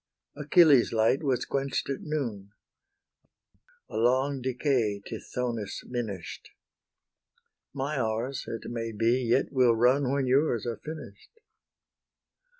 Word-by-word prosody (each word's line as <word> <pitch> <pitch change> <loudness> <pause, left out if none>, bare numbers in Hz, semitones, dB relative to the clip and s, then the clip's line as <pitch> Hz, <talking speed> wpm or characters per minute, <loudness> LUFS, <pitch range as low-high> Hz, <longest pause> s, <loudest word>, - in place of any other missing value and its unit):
Achilles' 150 -2 +5
light 115 +4 +2
was 130 -5 0
quench'd 140 0 -2
at 135 - -4
noon; 115 -10 -4 1.3
A - - -6
long 130 +4 +2
decay 125 -5 0
Tithonus 120 -5 -4
minish'd; 110 -8 -5 1.2
My 140 +1 -3
hours, 115 +3 -2
it 115 -2 -5
may 115 -1 -4
be, 115 +4 +2
yet 120 +3 +1
will 125 -4 +4
run 125 +3 +3
When 140 -1 0
yours 130 -3 +2
are 115 -2 -3
finish'd. 155 - -10
125 Hz, 110 wpm, -28 LUFS, 115-140 Hz, 1.3 s, Achilles